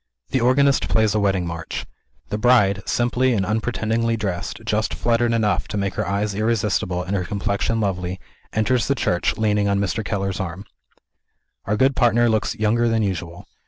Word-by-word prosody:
The 130 - +1
organist 135 +3 +3
plays 110 -2 +2
a 110 - +1
wedding 95 -3 +1
march. 85 -1 -5 0.4
The 105 +3 -2
bride, 105 -5 +4
simply 125 +1 +1
and 100 -4 0
unpretendingly 115 +1 0
dressed, 95 -3 -4
just 110 0 0
fluttered 120 0 +1
enough 105 -5 +1
to - - -4
make 100 -1 -1
her - - -2
eyes 100 +1 -1
irresistible, 105 -4 0
and 95 +2 -3
her 95 - 0
complexion 100 +4 -1
lovely, 95 -3 -2 0.3
enters 115 +2 +1
the 140 - +2
church, 90 -8 0
leaning 105 -2 +1
on 100 0 +1
Mr. 100 +2 -1
Keller's 100 -2 -2
arm. 95 +2 -5 1.0
Our 105 +2 0
good 135 +2 +3
partner 120 -1 +3
looks 110 +1 0
younger 115 +2 +1
than 115 -1 +1
usual. 85 -3 -4
105 Hz, 170 wpm, -22 LUFS, 95-115 Hz, 1.0 s, bride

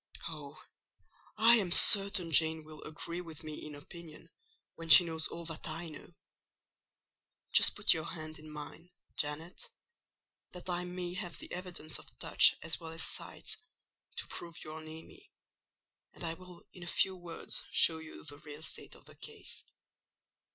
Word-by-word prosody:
Oh, - - -8 0.8
I 230 +2 +7
am 190 -5 -1
certain 195 -3 +8
Jane 160 +1 +3
will 155 0 -12
agree 170 +3 -5
with 165 -3 -11
me 155 -1 -7
in 150 -1 -8
opinion, 155 +2 -12 0.4
when 165 0 -10
she 175 - +12
knows 160 -2 0
all 170 0 -8
that 165 +1 -6
I 165 +2 -6
know! 155 +3 -13 1.4
Just - - +5
put 205 - +4
your 160 -2 -4
hand 155 -2 -7
in 155 0 -12
mine, 150 +3 -9 0.3
Janet—that 170 - -9
I 180 0 -2
may 180 0 -5
have 180 -2 -4
the - - -11
evidence 175 -4 -5
of - - -16
touch - - +5
as 160 - 0
well 165 -1 -8
as 165 - -2
sight, - - -3 0.6
to - - -2
prove 170 -2 -7
you 155 - -8
are 160 0 -8
near 160 +1 -10
me—and 385 - -20
I 165 -1 -2
will 180 0 -14
in 180 - -13
a 175 - -7
few 190 +2 +2
words 175 -2 -5
show 160 -1 +4
you 160 0 -11
the 145 -2 -8
real 150 +1 -10
state - - -6
of - - -18
the - - -15
case. - - -8
165 Hz, 165 wpm, -33 LUFS, 155-180 Hz, 1.4 s, she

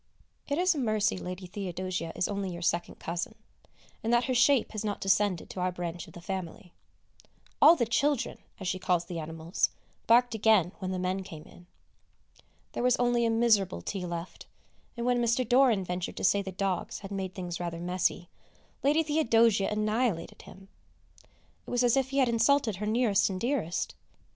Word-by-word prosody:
It 285 - -1
is 360 +1 +3
a 300 - -4
mercy 215 -4 +1
Lady 185 0 -6
Theodosia 180 -2 -4
is - - 0
only 200 -2 -3
your 170 0 -6
second 170 0 -1
cousin, 170 +1 -4 0.7
and 225 - 0
that 240 0 +4
her 260 - -1
shape 250 +1 +3
has 215 -1 -4
not 205 -1 -2
descended 195 -2 +1
to - - -7
our 180 0 0
branch 175 -1 -5
of - - -15
the 175 - -10
family. 185 -1 -6 0.9
All 320 +3 +9
the 240 - +1
"children" 260 +2 0 0.2
as 190 - -5
she 185 +1 -1
calls 175 -2 +1
the 170 -1 -5
animals 160 +2 -1 0.4
barked 245 +1 +5
again 215 -5 +3
when 185 -2 -4
the 185 - -2
men 185 +1 -1
came 160 -5 -10
in. 175 - -17 1.0
There - - -4
was 250 0 +4
only 240 -1 +2
a - - +1
miserable 220 - +2
tea 185 -3 -4
left, 170 +1 -7 0.5
and, 235 - -3
when 245 -1 +2
Mr. 235 +1 +1
Doran 245 -5 +4
ventured 180 0 -4
to - - -5
say 200 +2 +3
the 190 -1 -6
dogs 190 0 -2
had 200 0 -9
made 190 -2 -4
things 175 -2 -5
rather 170 -1 -4
messy, 180 0 -1 0.5
Lady 300 +4 +3
Theodosia 230 -9 +3
annihilated 215 -4 -1
him. 195 +1 -14 1.0
It - - -8
was 245 0 +1
as 245 0 +4
if 265 -1 +1
he 275 - -3
had 265 -2 +4
insulted 230 -2 +2
her 210 +2 -3
nearest 215 -2 +2
and 185 -1 -4
dearest! 235 - -1
200 Hz, 185 wpm, -29 LUFS, 180-240 Hz, 1.0 s, All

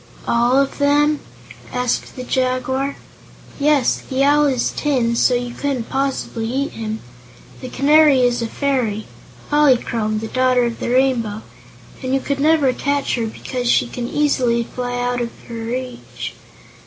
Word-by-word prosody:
"All 240 +2 +3
of 275 +1 -1
them?" 290 +1 +3 0.5
asked 250 -1 -2
the 255 - -6
Jaguar. 260 +2 -1 0.6
"Yes. 285 -3 +2
The 265 0 +1
Owl 295 +1 +4
is 255 -3 0
tin, 250 -6 +1
so 250 +1 +3
you 245 0 -3
couldn't 270 -5 -3
possibly 265 -4 -2
eat 280 +3 -1
him. 220 -1 -5 0.6
The 255 - -6
Canary 285 0 +5
is 245 -1 +2
a 230 - -1
fairy 240 -5 -1 0.5
Polychrome, 240 -7 +2
the 220 - -5
Daughter 255 0 +2
of 235 -1 -2
the - - -3
Rainbow 240 -4 +1 0.6
and 260 0 -1
you 275 +1 -1
never 295 -3 +3
could - - -14
catch 285 0 0
her 230 -2 -1
because 245 +2 -4
she - - +3
can 240 0 -5
easily 255 -5 +1
fly 245 +1 -4
out 245 0 -1
of 235 - -2 0.2
your 230 -1 -6
reach." 250 +1 -5
255 Hz, 155 wpm, -19 LUFS, 240-275 Hz, 0.6 s, Canary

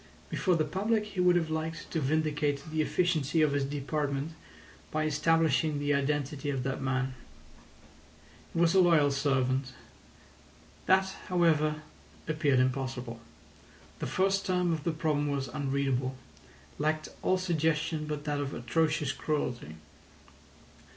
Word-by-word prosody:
Before 185 -2 +2
the 155 -2 +1
public 210 +7 0
he 205 -3 -7
would 180 0 +5
have 165 -2 +1
liked 160 +1 -4
to 160 - 0
vindicate 150 0 0
the 155 0 +1
efficiency 160 -2 +1
of 150 - +3
his 140 0 +1
department 145 +1 -2 0.6
by 155 0 -1
establishing 155 0 +2
the 145 0 +1
identity 145 0 -1
of 135 -3 -1
that 135 +1 -2
man. 130 0 -1 1.4
He - - -2
was 170 -1 +4
a 190 - +5
loyal 165 -5 +5
servant. 135 -2 0 1.1
That, 190 0 +4 0.2
however, 155 -4 +2 0.4
appeared 150 -4 +2
impossible. 130 -2 -1 0.8
The - - -3
first 195 +1 +1
term 180 -2 +1
of 155 -2 -4
the 170 - +2
problem 155 -2 0
was 135 -2 -2
unreadable—lacked 135 - -3
all 185 - +2
suggestion 160 -3 0
but 150 -1 -4
that 145 -1 -1
of 140 -1 -3
atrocious 150 +3 0
cruelty. 125 - -3
150 Hz, 130 wpm, -30 LUFS, 135-165 Hz, 1.4 s, would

